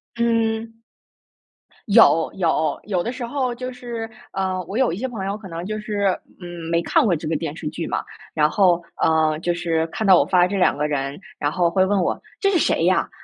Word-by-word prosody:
嗯。 225 -1 0 1.1
有， 200 -7 +5
有。 165 -3 0
有 190 -4 -1
的 240 - -2
时 250 -1 -5
候 255 0 -1
就 255 +1 -5
是 235 -2 -6 0.2
呃， 190 -1 -1
我 205 - -5
有 260 -2 +3
一 - - -4
些 260 +5 -2
朋 220 -6 -5
友 195 +1 -2
可 215 - -11
能 170 0 -6
就 215 +1 -3
是， 205 -3 0 0.2
嗯， 175 -2 -7
没 170 0 +2
看 325 -3 +3
过 180 -5 +3
这 155 0 -5
个 160 - 0
电 155 0 -3
视 160 - -6
剧 165 +1 -5
嘛。 - - -2 0.3
然 150 -1 +4
后， 180 -5 +3 0.2
呃， 155 -1 +3
就 175 +1 0
是 165 -2 0
看 215 +6 -4
到 190 -2 +7
我 - - +2
发 180 -1 +4
这 200 - -3
2 185 - +3
个 150 +1 0
人， 140 -1 -3 0.2
然 145 0 0
后 175 0 +2
会 185 +2 +2
问 195 +1 +1
我： 175 - 0 0.2
“这 395 -2 +2
是 355 - +3
谁 165 - +2
呀？ 185 +1 +2
190 Hz, 230 characters per minute, -22 LUFS, 165-225 Hz, 1.1 s, 到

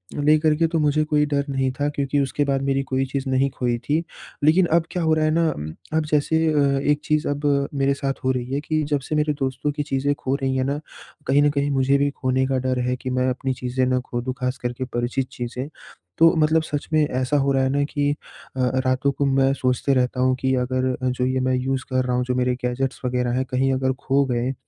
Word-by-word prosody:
लेकर 150 +1 +3
के 165 +1 +2
तो 165 0 -1
मुझे 150 0 +2
कोई 150 -1 +2
डर 140 -1 -1
नहीं 135 -1 0
था 145 - +1
क्योंकि 145 -1 -1
उसके 140 +1 0
बाद 135 -1 0
मेरी 135 0 +1
कोई 135 0 -1
चीज़ 135 0 -3
नहीं 130 +1 +2
खोई 120 -1 -1
थी। 150 +7 -1 0.4
लेकिन 170 +4 +5
अब 170 -1 +4
क्या 180 -2 -2
हो 160 - +3
रहा 155 0 +2
है 155 - +2
ना 165 0 +2
उम, 75 +1 -6 0.2
अब 160 -1 +1
जैसे 160 +2 +2
अ, 140 -2 +2
एक 145 0 +2
चीज़ 155 0 +1
अब 145 -1 0
मेरे 140 0 +1
साथ 140 -1 -2
हो 130 - +2
रही 125 +1 -3
है 140 - +1
कि 155 0 -1
जब 145 - +2
से 155 - -4
मेरे 150 0 +1
दोस्तों 135 +2 -1
की 150 0 -3
चीज़ें 140 0 0
खो 135 0 -2
रही 135 -1 -1
हैं 130 - +1
ना, 140 +2 -1 0.5
कहीं 140 +2 +4
न 145 - +4
कहीं 140 0 0
मुझे 135 +1 +3
भी 140 +1 +2
खोने 130 -1 0
का 135 -1 0
डर 130 -1 0
है 125 - +1
कि 130 0 -5
मैं 125 0 +1
अपनी 130 +1 -2
चीज़ें 125 +1 -1
ना 125 0 +1
खो 120 -1 -4
दूँ, 130 +1 -3
ख़ास 125 +1 -2
करके 125 +1 -4
परिचित 125 +1 -2
चीज़ें। 125 +3 -5 0.5
तो 165 +1 +6
मतलब 160 +1 +3
सच 145 -2 -4
में 155 - +4
ऐसा 130 +3 0
हो 140 0 +2
रहा 135 0 +2
है 130 - +1
ना 145 +1 +1
कि 145 0 0 0.4
अ - - -5
अ, 130 +1 0
रातों 130 +2 +2
को 140 +1 -1
मैं 135 0 +3
सोचते 130 0 0
रहता 125 0 +1
हूँ 130 0 +3
कि 130 0 +2
अगर 130 +1 0
अ, 130 - +2
जो 125 0 -1
ये 130 0 0
मैं 130 0 +1
यूज़ 130 +1 -1
कर 130 0 +1
रहा 125 -1 0
हूँ 125 - +1
जो 125 0 -1
मेरे 125 0 +1
गैजेट्स 130 +2 -2
वगैरह 125 -1 0
हैं 130 - 0
कहीं 135 +1 +2
अगर 130 0 0
खो 140 +1 +2
गए 120 +2 0
135 Hz, 255 wpm, -23 LUFS, 130-145 Hz, 0.5 s, तो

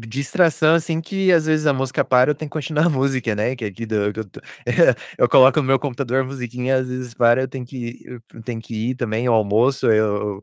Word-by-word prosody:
distração 155 +7 +1
assim 165 -1 -1
que, 190 +2 0
às 160 -2 +3
vezes, 155 -1 +1
a 145 - +4
música 135 -1 -1
para, 125 +2 +3
eu 150 - +1
tenho 150 +1 -8
que - - -34
continuar 155 +1 -1
a - - +4
música, 130 -5 -1
né, 115 +5 -2
que 115 - -7
aqui 105 +3 -6
do 105 -2 -1
que 110 - -6
eu - - -5
tô - - -14 0.3
eh, - - +4 0.2
eu - - +3
coloco 135 +4 +6
no 140 - -2
meu 135 0 +3
computador 130 -2 -2
a - - -1
musiquinha 125 0 -3
e, - - +3
às 130 - -5
vezes, 125 -1 -6
para 120 +2 +3
e - - 0
eu - - -5
tenho 130 -2 -7
que 120 -1 -8
eu 125 -2 -11
eu 115 - -11
tenho 115 -1 -6
que 115 - -10 0.2
ir - - -3
também 120 -1 -2
ao 120 - +3
almoço, 110 +5 +1
eu 105 -2 0
130 Hz, 265 wpm, -20 LUFS, 115-140 Hz, 0.3 s, coloco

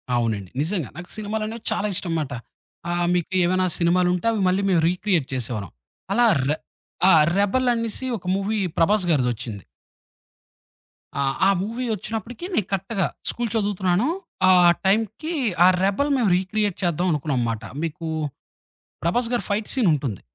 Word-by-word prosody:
అవునండి. 110 -6 -1
నిజంగా. 165 - -1
నాకు 175 0 -8
సినిమాలనేవి 215 +2 -4
చాలా 210 - 0
ఇష్టంమాట. 165 -6 -2 0.6
ఆ! - - 0 0.2
మీకు 180 +1 -1
ఏమైనా 185 +1 +2
సినిమాలుంటే 180 +3 +2
అవి 215 -3 -1
మళ్ళీ 185 +2 +1
మేము 175 -4 +3
రీక్రియేట్ 180 -5 0
చేసేవాళ్ళం. 110 -7 -3 0.4
అలా 240 +3 +4 0.2
ర్ 145 - +2 0.6
ఆ! - - +7 0.3
'రెబల్' 245 +6 +2
అనేసి 230 +2 -3
ఒక 180 - -16
మూవీ 200 +3 -1 0.2
'ప్రభాస్' 185 +2 +3
గారిదొచ్చింది. 120 - -1 1.6
ఆ! - - +2 0.2
ఆ - - +5
మూవీ 230 +5 -3
ఒచ్చినప్పటికి 225 - -6
నేను 210 - +1
కరెక్టుగా 195 0 0 0.2
స్కూలు 235 -2 -1
చదువుతున్నాను. 200 0 +1 0.4
ఆ - - +8 0.3
టైంకి 220 - 0 0.3
ఆ - - +8 0.2
'రెబల్' 210 +10 +1
మేము 225 -6 +2
రీక్రియేట్ 200 +1 -1
చేద్దాం 175 +1 +1
అనుకున్నాంమాట. 125 -7 -1 0.2
మీకు 165 +1 -4 1.0
ప్రభాస్ 230 +9 +1
గారి 240 - 0
ఫైట్ 210 +1 -1
సీనుంటుంది. 150 - +1
190 Hz, 135 wpm, -23 LUFS, 160-215 Hz, 1.6 s, ఆ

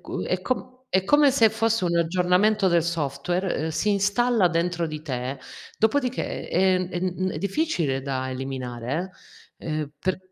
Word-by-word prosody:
cu - - -5
è - - -1
com 255 0 -3
è 190 -4 +2
come 290 +4 +5
se 230 -5 +4
fosse 225 -2 +1
un 170 -1 +1
aggiornamento 180 +4 +3
del 170 -2 +3
software, 170 +3 -1
ehm, 160 +2 -2
si 165 +7 0
installa 200 +1 +3
dentro 170 0 0
di 155 -1 -6
te 130 -2 -4 0.4
dopodiché 250 +3 0
è 185 0 +2
è 175 - -4
mhmm, 185 0 -1
è - - -4
difficile 190 - 0
da 130 -1 -3
eliminare, 130 +5 -4 0.5
eh. - - -11
Ehm, 155 -2 -2
per 185 +2 -1
180 Hz, 165 wpm, -25 LUFS, 155-205 Hz, 0.5 s, come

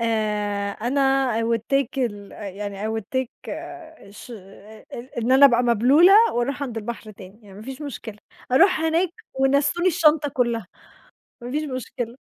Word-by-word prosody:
آآ، 210 -3 -1
أنا 245 +7 -2 0.4
I - - -1
will 230 -1 +1
take 275 0 0
ال 205 -5 -3
يعني 200 0 -6
I - - -2
will 220 - -3
take 260 -2 0 0.2
آآ، 315 -11 -10
ش 210 - -13
إ 210 +1 -13
إ 240 +1 -8
إن 240 +2 +1
أنا 280 +2 +8
أبقى 245 -2 +2
مبلولة 250 - +5 0.2
وأرُوح 260 +4 -2
عند 245 -5 -5
البحر 225 0 -6
تاني، 195 +1 -14
يعني 200 -2 -15
ما 210 - -10
فيش 265 +5 -8
مشكلة، 225 -6 -8 0.3
أرُوح 365 +4 +4
هناك 325 +3 +1 0.3
ونسّوني 280 +7 +2
الشنطة 310 -3 +3
كلها، 235 -6 -1 0.8
ما 245 - -7
فيش 300 +3 -1
مشكلة. 255 -3 -5
240 Hz, 165 wpm, -23 LUFS, 215-280 Hz, 0.8 s, أنا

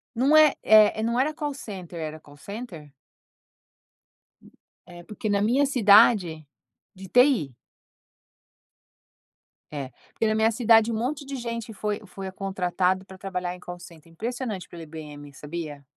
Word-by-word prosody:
Não 270 +6 +4
é 310 -2 +7
é 215 0 +5
não 235 +2 0
era 290 +4 +1
Call 295 -2 -4
Center 185 - -8
era 155 -1 -6
Call 145 -1 -17
Center? 175 - -9 1.9
É 175 -1 -12
porque 210 +4 -6
na 200 -1 +1
minha 255 +7 +3
cidade 205 - +4 0.5
de 190 0 -11
TI? 245 - +3 2.2
É 140 -3 -6 0.2
porque 225 - -1
na 215 - +1
minha 220 +1 +3
cidade 225 0 +4
um - - -2
monte 275 +5 -3
de 275 0 -5
gente 230 -2 -5
foi 210 0 -3
foi 195 0 -7
contratado 185 -1 -1
pra 190 -1 -13
trabalhar 180 -2 -4
em 180 - -13
Call 175 0 -8
Center 165 -2 -15
impressionante 225 +1 -5
pela 170 - -10
IBM, 150 -2 -10
sabia? 150 -1 -7
200 Hz, 145 wpm, -25 LUFS, 170-235 Hz, 2.2 s, é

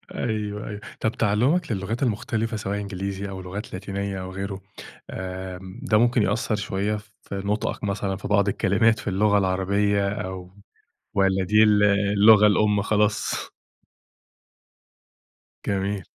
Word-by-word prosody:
أيوه، 105 -2 -3
أيوه. 105 0 -6 0.2
طَب 110 - +1
تعلُمَك 120 - +1
للغات 110 +6 -2
المختلفة 110 -1 -1
سواء 100 0 -3
إنجليزي 100 0 -4
أو 95 -1 -6
لغات 95 +4 -7
لاتينية 100 0 -4
أو 95 0 -6
غيره، 95 0 -5 0.5
آمم، 95 +2 -6
ده 105 - +3
ممكن 120 0 +3
يأثر 110 - 0
شوية 105 +1 -1
في 105 -1 -11
نطقك 105 +1 -2
مثلًا 100 -1 -1
في - - -6
بعض 105 -1 +3
الكلمات 100 +3 +2
في 105 - -4
اللغة 105 +2 +3
العربية 100 +1 +1
أو 95 -2 -5 0.6
والّا 95 -1 +2
دي 105 +3 +4
ال 105 -1 +5
اللغة 105 +1 +5
الأم 105 0 +3
خلاص؟ 105 0 0 2.2
جميل. 100 0 -1
100 Hz, 130 wpm, -24 LUFS, 95-105 Hz, 2.2 s, ال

